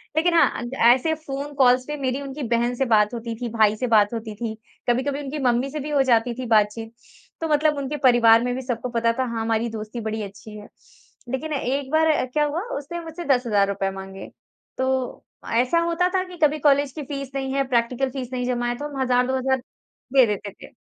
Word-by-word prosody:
लेकिन 335 +2 +2
हाँ, 335 - +5
अ, - - -5 0.3
ऐसे 290 +6 0
फ़ोन 290 -1 -6
कॉल्स 255 -2 +4
पे 295 0 -4
मेरी 265 0 -2
उनकी 280 +1 -6
बहन 240 +1 +1
से 270 - 0
बात 215 -2 +3
होती 230 -1 -5
थी, 240 - -2
भाई 215 -2 +3
से 250 +4 -2
बात 215 -2 +4
होती 220 -2 -5
थी, 225 0 -4 0.4
कभी-कभी 270 +4 0
उनकी 285 +2 -5
मम्मी 245 +2 +2
से 300 +2 -5
भी 295 +1 -5
हो 290 -2 +3
जाती 235 +1 +3
थी 255 - -3
बातचीत, 220 0 +1 0.5
तो 325 - -1
मतलब 300 0 +2
उनके 280 +1 -3
परिवार 230 -2 +6
में 245 0 -1
भी 260 - -4
सबको 245 -1 -3
पता 230 -1 +1
था 260 - +2
हाँ, 230 -2 -3
हमारी 225 +1 0
दोस्ती 220 +1 -6
बड़ी 220 0 -3
अच्छी 200 +2 -10
है। 210 - -11 0.6
लेकिन 265 +5 -3
एक 275 0 -2
बार 315 +1 +3
अ, 305 - +1
क्या 295 +4 0
हुआ 300 +4 -2 0.2
उसने 295 +5 -6
मुझसे 330 +1 -7
₹10,000 205 -7 +1
माँगे, 195 0 -8 0.5
तो 260 -1 -2 0.3
ऐसा 250 +8 +3
होता 340 +1 +1
था 370 - +2
कि 360 -1 -11
कभी 300 0 +3
कॉलेज 285 -1 +3
की 300 +2 -7
फ़ीस 275 -1 -6
नहीं 265 -1 -2
है, 275 0 +2
प्रैक्टिकल 250 +1 0
फ़ीस 255 -2 -6
नहीं 250 -1 -2
जमा 240 -1 -1
है 240 - -1
तो 290 - -5
हम 275 -2 -5
हज़ार 250 -1 +2
2,000 265 0 +1 0.6
दे 265 -2 +7
देते 205 -1 -3
थे। - - -14
255 Hz, 220 wpm, -23 LUFS, 230-280 Hz, 0.6 s, दे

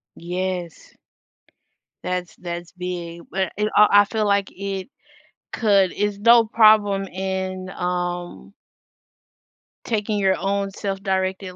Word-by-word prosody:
Yes. 180 -1 -5 1.1
That's, 180 -1 -3
that's 175 0 -6
big, 175 -2 -6
but 190 -1 -2
it 210 0 +1
I 210 0 +7
I - - +1
feel 215 +1 -1
like 200 -1 +1
it 195 +3 -5 0.6
could, 200 -5 +3
it's 205 -1 -2
no 235 +2 +6
problem 215 -3 +4
in, 190 0 -4
um 175 0 -4 1.3
taking 215 -2 -1
your 190 -1 +3
own 200 0 -1
self-directed 190 -1 -3
190 Hz, 110 wpm, -22 LUFS, 180-205 Hz, 1.3 s, I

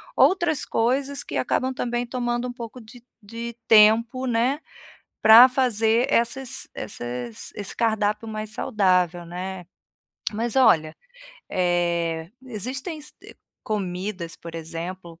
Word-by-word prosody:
outras 345 -6 +3
coisas 270 +5 0
que - - -5
acabam 260 0 0
também 240 -1 -2
tomando 240 0 -2
um 245 - -6
pouco 235 0 -8
de 235 +1 -15 0.2
de 230 +2 -7
tempo, 230 +4 +5
né, 245 +5 +1 0.6
para 225 +4 +10
fazer 240 -1 +2
essas 240 +2 0
esses 120 - -5
esse 205 -2 -5
cardápio 215 -1 0
mais 215 -1 -5
saudável, 185 -7 +1
né. 180 +2 -6 0.7
Mas, 230 +4 -2
olha, 160 -12 +4 0.5
eh, 170 -2 0 0.2
existem 260 - -5
se 300 - -10
eh, - - -13 0.3
comidas, 185 -3 -4
por 165 0 -10
exemplo, 165 +1 -7
220 Hz, 120 wpm, -24 LUFS, 180-245 Hz, 0.7 s, para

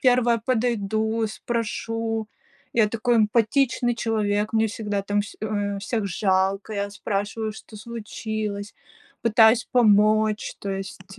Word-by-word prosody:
1 245 -2 +4
подойду, 220 -2 0
спрошу. 225 0 -3 0.4
Я 220 -3 +3
такой 235 +2 +1
эмпатичный 240 +3 +2
человек. 215 -2 0
Мне 225 0 +3
всегда 205 -2 -3
там 205 +1 0
вс 205 - -7
э, 205 -2 -2
всех 200 +1 -2
жалко, 195 +2 0
я 200 0 -2
спрашиваю: 205 +2 -3
"Что 215 0 -12
случилось?" 215 -2 -5 0.5
Пытаюсь 225 +1 +5
помочь. 215 -2 +3
То 200 - -4
есть, 195 0 -7
215 Hz, 120 wpm, -24 LUFS, 205-230 Hz, 0.5 s, Пытаюсь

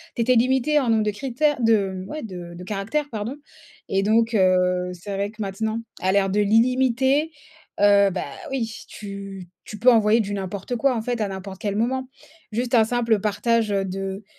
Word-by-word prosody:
tu 235 - -1
étais 250 +2 +3
limité 260 +5 +3
en 260 -4 -1
nombre 220 -1 +3
de 210 - 0
critères, 270 +6 0
de, 220 -4 +3 0.2
mmh, - - -12
ouais, 310 - -5
de 180 -5 -8
de 180 - -9
caractères, 215 +10 -2
pardon. 225 +4 -4 0.5
Et 195 0 +1
donc, 225 +2 +2
heu, 180 -2 +2
c'est 190 +3 -7
vrai 200 +1 -2
que 220 0 -10
maintenant, 220 +3 -2 0.2
à 185 - +2
l'ère 195 0 +2
de 205 +2 +1
l'illimité, 255 +7 +2 0.5
heu, 200 -1 +5
bah 185 - -3 0.3
oui, 230 -4 -4
tu 195 -2 -8 0.2
tu 210 - -9
peux 250 - +6
envoyer 220 -1 +4
du 205 -1 -4
n'importe 195 +4 -4
quoi 265 +1 +2
en 225 - -1
fait 240 0 -2
à 210 - +1
n'importe 190 0 -7
quel 205 -1 -2
moment. 255 +4 -1 0.4
Juste 240 +3 0
un 225 - +6
simple 230 -2 +1
partage, 220 +2 +1
heu, 195 -1 +1
de 195 +1 -5
215 Hz, 195 wpm, -23 LUFS, 195-240 Hz, 0.5 s, peux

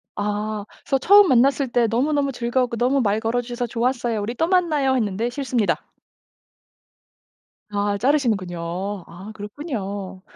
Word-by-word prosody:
아. 210 0 -2 0.2
그래서 270 - +1
처음 405 +7 +7
만났을 270 +1 +3
때 240 -1 +2
"너무너무 280 +4 +1
즐거웠고 240 -1 -1
너무 255 +3 +2
말 210 -1 +1
걸어 225 +2 0
주셔서 245 0 -4
좋았어요. 235 -2 -1
우리 215 +4 -3
또 325 - +1
만나요." 310 -8 +2
했는데 220 0 -1
"싫습니다." 245 -5 -1 1.8
아 205 0 -1
자르시는군요. 220 - 0 0.5
아 185 +5 -10
그렇군요. 205 - -6
240 Hz, 320 characters per minute, -22 LUFS, 210-270 Hz, 1.8 s, 처음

